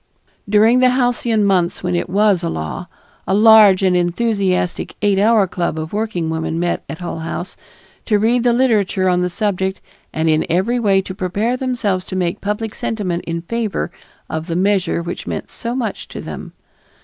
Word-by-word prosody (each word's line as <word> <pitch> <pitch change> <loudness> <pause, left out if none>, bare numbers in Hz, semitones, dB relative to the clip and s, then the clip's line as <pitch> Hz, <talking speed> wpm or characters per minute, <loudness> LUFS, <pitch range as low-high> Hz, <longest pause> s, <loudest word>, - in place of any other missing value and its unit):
During 220 +4 +5
the 255 0 +5
halcyon 245 -4 +1
months 185 -3 +1
when 180 0 0
it 175 - -2
was 200 -1 +3
a 170 - -2
law, 80 - -5 0.4
a 190 - +2
large 210 -3 +7
and 185 -1 +3
enthusiastic 185 0 0
Eight 200 -2 +3
Hour 215 0 +4
Club 175 -3 -3
of 155 +2 -5
working 210 -6 -2
women 160 0 -2
met 175 0 -1
at 160 +4 -7
Hull 170 -1 -4
House, 165 +3 -5 0.5
to 210 - +2
read 230 +4 +2
the 240 0 +3
literature 215 -6 +2
on 180 -1 +2
the 180 - 0
subject 190 0 -1 0.3
and 160 +1 -1
in 155 0 +3
every 195 +9 +1
way 195 -4 +2
to 185 - -7
prepare 200 +6 -1
themselves 240 -8 -1
to - - -6
make 180 +1 -1
public 210 +2 -3
sentiment 185 -6 -3
in 170 0 -4
favor 220 -2 -2 0.4
of 160 +1 -4
the 165 - -2
measure 190 -2 +1
which 175 +1 -6
meant - - -5
so 235 +1 -4
much 235 -5 -3
to - - -8
them. - - -8
195 Hz, 185 wpm, -18 LUFS, 175-220 Hz, 0.5 s, large